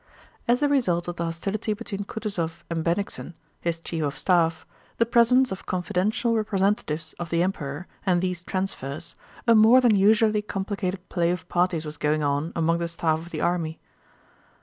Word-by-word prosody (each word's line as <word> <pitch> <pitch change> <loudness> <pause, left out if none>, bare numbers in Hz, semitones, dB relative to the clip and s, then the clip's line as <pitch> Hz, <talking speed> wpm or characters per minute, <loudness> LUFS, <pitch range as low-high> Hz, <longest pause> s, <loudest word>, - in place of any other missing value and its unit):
As 245 +4 +3
a - - +5
result 185 -12 +1
of 175 0 -4
the 170 - -1
hostility 195 +6 -2
between 205 -2 -5
Kutúzov 175 -7 -4
and 165 -1 -1
Bennigsen, 175 0 -2 0.2
his 170 -1 -2
Chief 165 -1 -3
of 140 -1 -2
Staff, 165 -3 +2 0.3
the 230 - +3
presence 240 +2 +4
of 190 - -6
confidential 195 +7 0
representatives 195 -6 0
of 175 -1 -4
the 170 +1 +2
Emperor, 155 -4 -3 0.2
and 180 -3 +2
these 180 -1 -2
transfers, 180 -7 -3 0.3
a 230 - +7
more 225 +3 +7
than 240 -4 +4
usually 215 +2 +4
complicated 195 -2 -3
play 170 -1 +1
of 180 0 -3
parties 175 -2 +1
was 150 0 -4
going 150 +1 +1
on 145 +3 0
among 165 0 +1
the 170 - -1
staff 165 -2 0
of 170 +1 -10
the 155 -3 -4
army. 165 -2 -1
180 Hz, 170 wpm, -25 LUFS, 165-210 Hz, 0.3 s, a